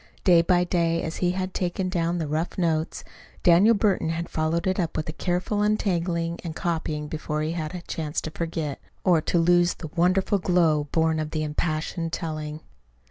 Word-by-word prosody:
Day 175 Hz, -3 st, +6 dB
by 175 Hz, +1 st, +3 dB
day, 170 Hz, -2 st, +1 dB
as 160 Hz, -, -4 dB
he 180 Hz, -1 st, +1 dB
had 185 Hz, 0 st, -3 dB
taken 185 Hz, +1 st, -1 dB
down 175 Hz, -1 st, 0 dB
the 165 Hz, -, -1 dB
rough 155 Hz, +4 st, -2 dB
notes, 165 Hz, -3 st, 0 dB, 0.4 s
Daniel 190 Hz, +7 st, +6 dB
Burton 200 Hz, -5 st, +1 dB
had 170 Hz, +1 st, -3 dB
followed 160 Hz, +2 st, 0 dB
it 190 Hz, +1 st, 0 dB
up 170 Hz, -3 st, -1 dB
with 155 Hz, -, -2 dB
a -, -, -3 dB
careful 180 Hz, +5 st, -1 dB
untangling 175 Hz, -5 st, 0 dB
and 165 Hz, -3 st, -5 dB
copying 160 Hz, -3 st, -2 dB
before 150 Hz, 0 st, -3 dB
he 155 Hz, -, -1 dB
had 165 Hz, -1 st, -4 dB
had 180 Hz, -1 st, -6 dB
a -, -, -35 dB
chance 155 Hz, -1 st, -2 dB
to 155 Hz, -, -6 dB
forget, 160 Hz, -4 st, -3 dB, 0.2 s
or 175 Hz, -4 st, +4 dB
to 175 Hz, -, 0 dB
lose 175 Hz, +1 st, +4 dB
the 160 Hz, -, -8 dB
wonderful 185 Hz, +3 st, +2 dB
glow 165 Hz, -5 st, +2 dB
born 160 Hz, -1 st, +2 dB
of 155 Hz, -1 st, -2 dB
the 155 Hz, 0 st, -2 dB
impassioned 155 Hz, +2 st, -2 dB
telling. 155 Hz, -2 st, -4 dB
170 Hz, 190 wpm, -25 LUFS, 155-180 Hz, 0.4 s, Day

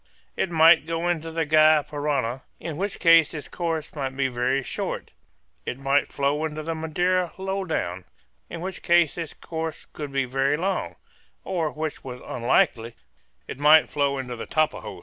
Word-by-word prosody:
It -, -, -1 dB
might 160 Hz, -1 st, +6 dB
go 165 Hz, +1 st, -1 dB
into 165 Hz, -2 st, -1 dB
the 165 Hz, 0 st, -1 dB
Gy 155 Hz, 0 st, +5 dB
Parana, 140 Hz, -4 st, -2 dB, 0.2 s
in 165 Hz, -3 st, -5 dB
which 195 Hz, +5 st, -3 dB
case 165 Hz, -2 st, +5 dB
its 150 Hz, -, -6 dB
course 165 Hz, -3 st, -3 dB
must 135 Hz, -3 st, -4 dB
be 135 Hz, -1 st, +1 dB
very 125 Hz, +2 st, 0 dB
short; -, -, -4 dB, 0.5 s
it 125 Hz, -, -4 dB
might 135 Hz, +1 st, +1 dB
flow 145 Hz, +2 st, 0 dB
into 155 Hz, 0 st, -3 dB
the 165 Hz, +1 st, -2 dB
Madeira 175 Hz, +3 st, 0 dB
low 190 Hz, +1 st, -2 dB
down, 90 Hz, -, -3 dB, 0.4 s
in 165 Hz, -, -7 dB
which 190 Hz, 0 st, -5 dB
case 170 Hz, -3 st, +3 dB
its 165 Hz, -3 st, -6 dB
course 160 Hz, -1 st, -5 dB
would 150 Hz, -2 st, -5 dB
be 135 Hz, -1 st, 0 dB
very 135 Hz, +3 st, +1 dB
long; 190 Hz, +4 st, -2 dB, 0.5 s
or, 165 Hz, -4 st, -1 dB
which 155 Hz, 0 st, -5 dB
was 125 Hz, -1 st, -7 dB
unlikely, 120 Hz, -1 st, +1 dB, 0.5 s
it -, -, -7 dB
might 150 Hz, +2 st, +6 dB
flow 140 Hz, -1 st, 0 dB
into 125 Hz, -2 st, -5 dB
the 115 Hz, -, -7 dB
Tapajos. 155 Hz, 0 st, -1 dB
155 Hz, 170 wpm, -25 LUFS, 135-165 Hz, 0.5 s, might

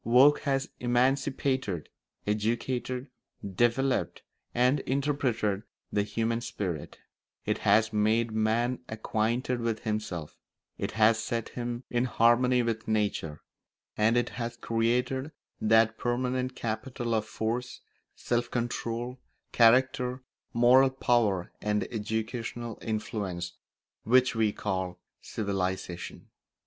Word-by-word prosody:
Work 130 Hz, +6 st, +6 dB
has 135 Hz, 0 st, +1 dB
emancipated, 130 Hz, -, +1 dB, 0.4 s
educated, 120 Hz, +5 st, -1 dB, 0.4 s
developed, 120 Hz, +7 st, +1 dB, 0.3 s
and 125 Hz, +4 st, +3 dB
interpreted 130 Hz, -8 st, 0 dB, 0.3 s
the 105 Hz, -, +3 dB
human 115 Hz, +3 st, -1 dB
spirit; 95 Hz, -9 st, -4 dB, 0.5 s
it -, -, 0 dB
has 110 Hz, +2 st, +3 dB
made 110 Hz, +2 st, +2 dB
man 115 Hz, +3 st, +1 dB
acquainted 115 Hz, +3 st, -1 dB
with 115 Hz, -2 st, -1 dB
himself; 105 Hz, -8 st, -3 dB, 0.4 s
it -, -, -3 dB
has 110 Hz, 0 st, +4 dB
set 115 Hz, +1 st, -2 dB
him 120 Hz, 0 st, -4 dB
in 120 Hz, +1 st, +2 dB
harmony 125 Hz, +1 st, +4 dB
with 115 Hz, -1 st, -2 dB
nature; 105 Hz, -8 st, -1 dB, 0.5 s
and 110 Hz, +3 st, +3 dB
it 120 Hz, -1 st, +1 dB
has 120 Hz, -1 st, -5 dB
created 125 Hz, +5 st, 0 dB, 0.3 s
that 110 Hz, +1 st, +4 dB
permanent 125 Hz, +1 st, -1 dB
capital 120 Hz, +1 st, -3 dB
of 110 Hz, -1 st, +1 dB
force, 120 Hz, +4 st, -3 dB, 0.3 s
self 120 Hz, 0 st, -1 dB
control, 120 Hz, +1 st, -3 dB, 0.3 s
character, 125 Hz, +2 st, +4 dB, 0.3 s
moral 125 Hz, +3 st, +6 dB
power, 120 Hz, -8 st, +1 dB
and 105 Hz, 0 st, +1 dB
educational 115 Hz, +1 st, -3 dB
influence 100 Hz, -5 st, -3 dB, 0.5 s
which 130 Hz, +2 st, +4 dB
we 110 Hz, -2 st, +2 dB
call 95 Hz, -3 st, -3 dB, 0.2 s
civilisation. 95 Hz, -4 st, -3 dB
115 Hz, 105 wpm, -29 LUFS, 110-125 Hz, 0.5 s, Work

